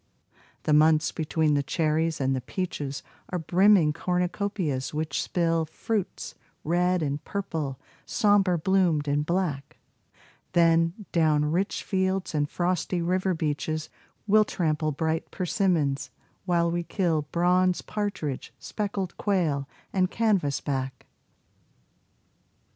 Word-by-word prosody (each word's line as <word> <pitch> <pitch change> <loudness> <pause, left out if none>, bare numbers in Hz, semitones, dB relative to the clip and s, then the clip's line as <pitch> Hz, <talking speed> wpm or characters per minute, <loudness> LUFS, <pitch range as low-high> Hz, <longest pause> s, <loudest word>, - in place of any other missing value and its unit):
The 155 - +2
months 155 +1 +4
between 155 -1 0
the 145 - +2
cherries 160 +2 0
and 135 -1 +1
the 130 - -2
peaches 145 -2 -4 0.3
Are 180 - -2
brimming 180 -1 +4
cornucopias 180 -5 -2
which 155 +1 -1
spill 165 -2 +1
Fruits 205 +5 -3 0.3
red 180 +1 +1
and 145 0 -2
purple, 160 -9 -4 0.2
somber 205 -4 +3
bloomed 170 -4 +2
and 145 +1 +1
black; 160 -4 -2 0.8
Then, 165 +3 +3
down 150 -3 +2
rich 190 +5 -1
fields 190 -1 -1
and 145 -1 0
frosty 180 0 -1
river 185 +1 +1
beaches 155 0 -2 0.4
We'll 215 +1 +5
trample 155 -5 -1
bright 160 +2 -2
persimmons, 160 -8 0 0.4
while 170 -2 +2
we 175 0 0
kill 165 -4 -1
Bronze 180 +1 +2
partridge, 200 -10 -3
speckled 200 -4 -4
quail, 155 -9 0 0.2
and 185 -1 +2
canvas 195 -12 +1
back. 130 -2 -3
165 Hz, 115 wpm, -26 LUFS, 150-185 Hz, 0.8 s, We'll